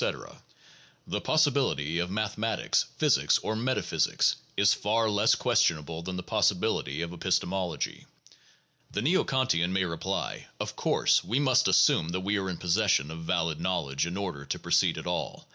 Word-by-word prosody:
The -, -, -3 dB
"possibility" 130 Hz, -, +1 dB
of 85 Hz, +1 st, -1 dB
mathematics, 110 Hz, +2 st, -1 dB
physics, -, -, +3 dB
or 110 Hz, -, -2 dB
metaphysics 125 Hz, +4 st, 0 dB, 0.2 s
is 100 Hz, 0 st, +5 dB
far 110 Hz, +2 st, 0 dB
less 105 Hz, +1 st, +3 dB
questionable 80 Hz, 0 st, 0 dB
than 90 Hz, +2 st, -5 dB
the 90 Hz, -, -5 dB
possibility 85 Hz, -, 0 dB
of 85 Hz, +1 st, -6 dB
epistemology. 90 Hz, +1 st, -2 dB, 0.8 s
The 105 Hz, -, -3 dB
neo 175 Hz, +8 st, +3 dB
Kantian 130 Hz, -, +1 dB
may 95 Hz, 0 st, +1 dB
reply: 85 Hz, -2 st, -4 dB
"Of -, -, -4 dB
course -, -, +2 dB
we 120 Hz, +5 st, 0 dB
must 130 Hz, -3 st, +3 dB
assume 80 Hz, -, +4 dB
that 95 Hz, -, -2 dB
we 100 Hz, +2 st, 0 dB
are 95 Hz, -1 st, -3 dB
in 90 Hz, -, -4 dB
possession 90 Hz, -5 st, +1 dB
of 80 Hz, 0 st, -8 dB
valid 80 Hz, -3 st, -1 dB
knowledge 85 Hz, -5 st, -1 dB
in 90 Hz, +2 st, -4 dB
order 90 Hz, -8 st, -4 dB
to -, -, -4 dB
proceed -, -, +1 dB
at -, -, -6 dB
all. -, -, -4 dB
95 Hz, 155 wpm, -28 LUFS, 85-110 Hz, 0.8 s, is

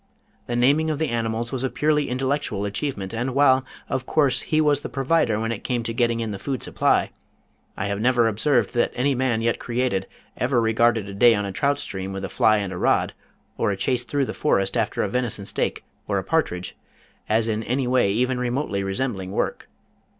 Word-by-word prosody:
The 120 Hz, -, -2 dB
naming 140 Hz, +6 st, +3 dB
of 155 Hz, -, -1 dB
the 160 Hz, +1 st, -1 dB
animals 115 Hz, 0 st, -2 dB
was 130 Hz, -1 st, -2 dB
a 130 Hz, -, +1 dB
purely 150 Hz, 0 st, +1 dB
intellectual 130 Hz, -5 st, -1 dB
achievement, 100 Hz, -1 st, -3 dB
and 125 Hz, +3 st, -2 dB
while, 135 Hz, -2 st, +5 dB, 0.2 s
of 130 Hz, -, -3 dB
course, 140 Hz, -5 st, +2 dB
he 155 Hz, -, 0 dB
was 150 Hz, -2 st, +3 dB
the -, -, -7 dB
provider 135 Hz, -5 st, +1 dB
when 115 Hz, +1 st, -1 dB
it 115 Hz, -, -5 dB
came 120 Hz, -2 st, -1 dB
to 115 Hz, -, -3 dB
getting 115 Hz, -1 st, +1 dB
in 110 Hz, -2 st, -3 dB
the 100 Hz, -, -5 dB
food 135 Hz, -4 st, -3 dB
supply, -, -, +1 dB, 0.7 s
I -, -, -2 dB
have 100 Hz, 0 st, -2 dB
never 120 Hz, -1 st, +3 dB
observed 120 Hz, +4 st, +1 dB
that 120 Hz, -, +1 dB
any 140 Hz, +3 st, +1 dB
man 125 Hz, -3 st, 0 dB
yet 115 Hz, 0 st, 0 dB
created 120 Hz, -5 st, -1 dB, 0.3 s
ever 125 Hz, 0 st, +1 dB
regarded 115 Hz, -1 st, +2 dB
a 100 Hz, -, -7 dB
day 115 Hz, +3 st, +5 dB
on 105 Hz, 0 st, -1 dB
a 100 Hz, -, -4 dB
trout 140 Hz, +8 st, +1 dB
stream 95 Hz, -6 st, -5 dB
with 95 Hz, 0 st, -4 dB
a -, -, -6 dB
fly 110 Hz, +1 st, +3 dB
and 100 Hz, -2 st, -3 dB
a -, -, -5 dB
rod, -, -, +2 dB, 0.5 s
or 115 Hz, -, +2 dB
a 100 Hz, -, -1 dB
chase 125 Hz, +6 st, 0 dB
through 140 Hz, +2 st, 0 dB
the -, -, -5 dB
forest 95 Hz, -9 st, +1 dB
after -, -, 0 dB
a -, -, 0 dB
venison 120 Hz, -5 st, -2 dB
steak, -, -, -2 dB, 0.2 s
or 100 Hz, -, 0 dB
a 95 Hz, -, -1 dB
partridge, 95 Hz, -, -1 dB, 0.5 s
as 110 Hz, +1 st, +2 dB
in 110 Hz, -1 st, -1 dB
any 125 Hz, +4 st, -1 dB
way 125 Hz, -5 st, +2 dB
even 125 Hz, +4 st, 0 dB
remotely 125 Hz, -4 st, -1 dB
resembling 95 Hz, -1 st, -2 dB
work. -, -, -2 dB
120 Hz, 210 wpm, -23 LUFS, 105-130 Hz, 0.7 s, while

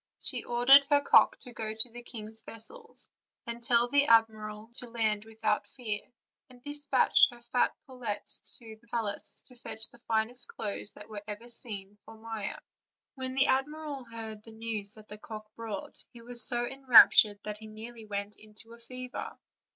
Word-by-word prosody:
She -, -, -2 dB
ordered 245 Hz, +4 st, +7 dB
her 290 Hz, -1 st, +5 dB
cock -, -, +5 dB
to 245 Hz, -, -11 dB
go 220 Hz, -1 st, -4 dB
to 225 Hz, +2 st, +5 dB
the 240 Hz, +1 st, -9 dB
king's 220 Hz, -2 st, -8 dB
vessels, 445 Hz, -, -4 dB, 0.4 s
and 235 Hz, 0 st, -6 dB
tell 235 Hz, 0 st, +3 dB
the 285 Hz, +2 st, +3 dB
admiral 220 Hz, -1 st, +2 dB
to 245 Hz, -, -8 dB
land 220 Hz, -2 st, 0 dB
without 220 Hz, -1 st, -1 dB
fear, 215 Hz, -5 st, -4 dB, 0.5 s
and 250 Hz, -1 st, -16 dB
dispatched 290 Hz, -2 st, +4 dB
her 240 Hz, -, -13 dB
fat 245 Hz, +1 st, 0 dB
pullet 245 Hz, -7 st, -5 dB, 0.3 s
to 225 Hz, -2 st, -12 dB
her 235 Hz, -, -26 dB
palace 225 Hz, -3 st, -2 dB
to 250 Hz, -, -18 dB
fetch 220 Hz, -2 st, -5 dB
the 240 Hz, -, -18 dB
finest 230 Hz, +2 st, 0 dB
clothes 205 Hz, -1 st, -6 dB
that -, -, -12 dB
were 210 Hz, -1 st, -7 dB
ever 210 Hz, +3 st, -7 dB
seen 205 Hz, -4 st, -2 dB
for 225 Hz, +1 st, -13 dB
Maia. 220 Hz, -2 st, -5 dB, 0.6 s
When 260 Hz, -2 st, -5 dB
the 270 Hz, +1 st, +4 dB
admiral 285 Hz, +1 st, -1 dB
heard 225 Hz, -2 st, -8 dB
the 225 Hz, +1 st, -14 dB
news 220 Hz, -2 st, -5 dB
that 215 Hz, -1 st, -15 dB
the 210 Hz, -, -10 dB
cock 215 Hz, -1 st, -9 dB
brought 225 Hz, -4 st, -7 dB
he 235 Hz, -1 st, -14 dB
was 240 Hz, -1 st, -4 dB
so 240 Hz, +1 st, +2 dB
enraptured 240 Hz, -5 st, +7 dB
that 210 Hz, 0 st, -5 dB
he 220 Hz, -, -10 dB
nearly 225 Hz, +1 st, -10 dB
went 205 Hz, 0 st, -4 dB
into 215 Hz, +2 st, -15 dB
a 235 Hz, -, -14 dB
fever. 250 Hz, +1 st, -7 dB
230 Hz, 175 wpm, -30 LUFS, 215-245 Hz, 0.6 s, ordered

